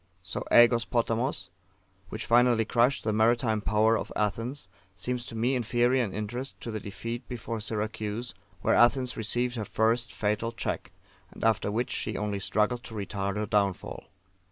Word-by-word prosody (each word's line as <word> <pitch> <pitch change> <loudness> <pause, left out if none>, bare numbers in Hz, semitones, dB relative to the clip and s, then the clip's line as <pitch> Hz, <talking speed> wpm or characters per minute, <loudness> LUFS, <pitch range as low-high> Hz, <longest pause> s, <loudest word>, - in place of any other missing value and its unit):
So, 95 - -4
AEgos 120 0 +7
Potamos, 115 -4 0 0.6
which 110 +4 -5
finally 120 -1 +4
crushed 120 +4 +2
the 110 - 0
maritime 110 0 +2
power 110 +2 +3
of - - -3
Athens, 115 +3 -1 0.3
seems 125 +3 -3
to 115 - -7
me 120 +4 +1
inferior 120 +1 +2
in 105 - -3
interest 110 +7 -5
to 115 - -5
the 110 - -3
defeat 115 +5 -6
before 115 -2 -4
Syracuse, 110 +2 -3 0.3
where - - +2
Athens 125 +1 +4
received 120 +3 -1
her 110 - -2
first 115 +3 +1
fatal 105 +2 -1
check, - - -3 0.4
and - - -10
after 110 -2 +2
which 120 +3 -1
she 110 - -2
only 105 -1 -2
struggled 105 +5 +1
to 110 - -9
retard 100 -1 -3
her 105 - -1
downfall. 100 -2 -1
115 Hz, 160 wpm, -28 LUFS, 105-120 Hz, 0.6 s, AEgos